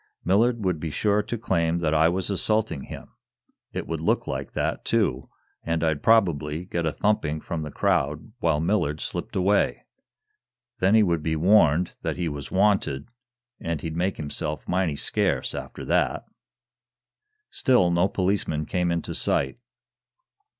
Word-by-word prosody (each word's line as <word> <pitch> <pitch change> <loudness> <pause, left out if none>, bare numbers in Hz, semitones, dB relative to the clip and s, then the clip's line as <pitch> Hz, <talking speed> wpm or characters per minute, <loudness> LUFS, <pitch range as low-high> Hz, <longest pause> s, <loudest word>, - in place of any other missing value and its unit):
"Millard 110 +4 +2
would 90 -4 0
be 80 - -3
sure 105 +7 +1
to 120 - -4
claim 85 -7 0
that 80 -3 0
I 80 +1 +4
was 95 +2 -1
assaulting 105 -5 -1
him. - - -10 0.6
It - - -4
would 80 -1 -4
look 80 - +1
like 65 0 -5
that, - - -2
too, 65 +1 0 0.3
and 85 0 -1
I'd 80 -3 +1
probably 85 -7 +2
get 85 -3 -2
a - - +1
thumping 80 -6 0
from 80 +1 -4
the 75 - -5
crowd, 75 - 0
while 80 -6 +1
Millard 80 -3 0
slipped - - -4
away. 100 +2 +1 0.9
Then 95 +3 +4
he 110 - +6
would 85 -4 +1
be 80 +1 -1
warned 85 -1 +4
that - - -3
he 90 -1 -1
was 70 -2 -5
wanted, 95 - +1 0.5
and 85 -3 -3
he'd 80 0 -4
make 90 +3 -1
himself 75 0 -4
mighty 90 -4 0
scarce - - 0
after - - -7
that." - - +1 1.3
Still 105 -10 +3
no 85 +2 +3
policeman 90 -6 -1
came 90 +1 0
into 85 -1 -2
sight. 70 - -1
85 Hz, 155 wpm, -25 LUFS, 75-95 Hz, 1.3 s, he